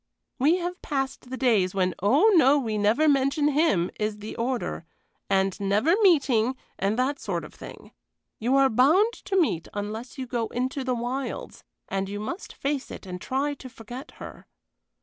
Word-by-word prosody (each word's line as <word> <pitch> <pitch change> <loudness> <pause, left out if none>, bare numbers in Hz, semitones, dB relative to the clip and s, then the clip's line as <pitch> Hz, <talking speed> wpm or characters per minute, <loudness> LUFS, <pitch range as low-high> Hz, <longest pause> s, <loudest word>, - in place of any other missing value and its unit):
We 295 +7 +4
have 360 0 -4
passed 270 -3 -3
the 260 - -5
days 210 -8 +2
when 185 -1 +1
'Oh 275 - +5
no, 290 -5 +6
we 225 -6 -2
never 225 +10 +3
mention 285 +1 +3
him' 280 - +2
is 210 0 -1
the 210 +1 -8
order, 240 -6 -2 0.5
and 195 -1 +2
'never 205 - +2
meeting,' 265 - +3 0.2
and 200 +3 0
that 265 +3 0
sort - - -3
of - - -13
thing. - - -11 0.5
You 245 +4 +1
are 275 0 +6
bound 310 - +4
to 385 -1 +1
meet 170 - 0
unless 215 +6 -5
you 260 - -4
go 235 -2 -2
into 260 +2 -2
the 255 -1 0
wilds. 250 +3 -4 0.2
And 195 0 -2
you 205 +1 -4
must 340 - -5
face 280 -1 -3
it - - -9
and 180 -1 -7
try 280 +3 -1
to 265 -2 -10
forget 245 +5 -10
her." - - -11
255 Hz, 175 wpm, -26 LUFS, 210-285 Hz, 0.5 s, no